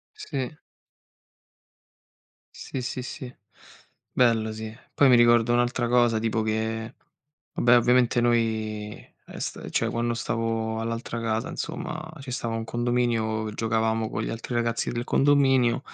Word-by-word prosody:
Sì. 135 Hz, -1 st, -4 dB, 2.0 s
Sì, 130 Hz, -, -6 dB
sì, 125 Hz, -, -4 dB
sì, 125 Hz, 0 st, -7 dB, 0.8 s
bello, 115 Hz, -3 st, +2 dB
sì. 110 Hz, 0 st, -6 dB, 0.2 s
Poi 140 Hz, -, +5 dB
mi 125 Hz, -, +7 dB
ricordo 120 Hz, 0 st, +5 dB
un'altra 120 Hz, 0 st, +1 dB
cosa, 120 Hz, -2 st, +3 dB
tipo, 110 Hz, 0 st, 0 dB
che, 110 Hz, +1 st, -2 dB, 0.6 s
vabbè, 120 Hz, 0 st, +5 dB
ovviamente, 125 Hz, 0 st, +3 dB
noi, 110 Hz, -3 st, 0 dB, 0.3 s
ehm, -, -, -11 dB
sta -, -, -5 dB
cioè -, -, +1 dB
quando 120 Hz, 0 st, -1 dB
stavo 115 Hz, -1 st, -2 dB
all'altra 115 Hz, +1 st, -4 dB
casa, 115 Hz, -1 st, -1 dB
insomma, 155 Hz, 0 st, -5 dB
ci 135 Hz, -1 st, -8 dB
stava 120 Hz, -2 st, -3 dB
un 115 Hz, -, -3 dB
condominio 115 Hz, -2 st, 0 dB
giocavamo 110 Hz, 0 st, 0 dB
con -, -, -3 dB
gli -, -, -3 dB
altri 115 Hz, +2 st, -5 dB
ragazzi 115 Hz, -1 st, 0 dB
del 120 Hz, 0 st, -3 dB
condominio 135 Hz, -3 st, +3 dB
115 Hz, 130 wpm, -26 LUFS, 110-120 Hz, 2.0 s, mi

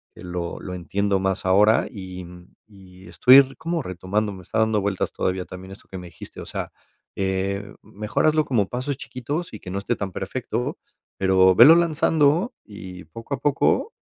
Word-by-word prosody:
que -, -, -13 dB
lo 90 Hz, -1 st, -5 dB
lo 90 Hz, -, -6 dB
entiendo 100 Hz, +3 st, -1 dB
más 95 Hz, 0 st, -2 dB
ahora, 105 Hz, +4 st, +4 dB
y, 95 Hz, -2 st, -8 dB
mm, 90 Hz, 0 st, -15 dB
y 95 Hz, -3 st, -16 dB
estoy 130 Hz, +9 st, +6 dB
como 165 Hz, -1 st, -3 dB
retomando, 95 Hz, +3 st, -2 dB
me 95 Hz, -, -10 dB
está 110 Hz, -, -5 dB
dando 110 Hz, -1 st, +2 dB
vueltas 100 Hz, -1 st, -1 dB
todavía 90 Hz, 0 st, -2 dB
también 95 Hz, +1 st, -10 dB
esto 95 Hz, -, -16 dB
que 95 Hz, -, -8 dB
me 90 Hz, -, -9 dB
dijiste, 85 Hz, -, -11 dB
o -, -, -8 dB
sea, -, -, -5 dB, 0.4 s
eh, 95 Hz, +1 st, -2 dB
mejor 105 Hz, +1 st, -2 dB
hazlo 155 Hz, 0 st, +3 dB
como 105 Hz, -7 st, 0 dB
pasos 130 Hz, +2 st, -3 dB
chiquitos 130 Hz, +8 st, -5 dB
y 110 Hz, -, -7 dB
que 95 Hz, -, -10 dB
no 100 Hz, -, -2 dB
esté 120 Hz, +4 st, -2 dB
tan 100 Hz, -3 st, -4 dB
perfecto, -, -, -4 dB, 0.4 s
pero 95 Hz, -1 st, +4 dB
velo 135 Hz, -, +9 dB
lanzando 165 Hz, -, +2 dB
y 95 Hz, -4 st, -10 dB
poco 115 Hz, -, -8 dB
a -, -, -12 dB
poco 145 Hz, -, +1 dB
100 Hz, 185 wpm, -23 LUFS, 95-125 Hz, 0.4 s, velo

